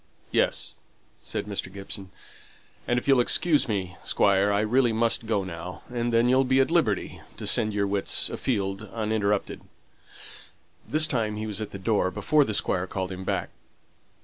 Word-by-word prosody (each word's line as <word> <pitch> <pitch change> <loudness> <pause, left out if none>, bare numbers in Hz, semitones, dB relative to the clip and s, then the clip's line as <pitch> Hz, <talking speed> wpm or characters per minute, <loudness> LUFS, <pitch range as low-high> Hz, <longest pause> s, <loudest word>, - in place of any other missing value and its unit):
"Yes," - - +1 0.5
said - - -4
Mr. 100 -2 -4
Gibson, 100 0 -7 0.8
"and 120 - +1
if 125 - -3
you 140 - +6
will 125 - +4
excuse 150 +4 +3
me, 95 -5 -3
Squire, 100 0 +3
I 100 0 +2
really 120 +3 +2
must 115 0 0
go 105 -3 +1
now, 90 0 -7
and 120 0 -1
then 115 +1 +3
you'll 130 +2 +4
be 130 +1 +2
at 135 - +2
liberty 130 - 0 0.2
to - - -6
send 110 - +2
your 100 -1 0
wits 100 0 +1
afield 100 -4 -2
uninterrupted." 105 -2 -1 1.3
This 155 +1 +5
time 115 -7 -1
he 105 +1 -4
was 105 -1 -4
at 105 - -4
the - - -7
door 100 -1 +1
before 150 +11 +2
the 110 - -1
Squire 95 -2 +2
called 95 0 -4
him 95 0 -6
back. - - -2
105 Hz, 175 wpm, -26 LUFS, 100-120 Hz, 1.3 s, you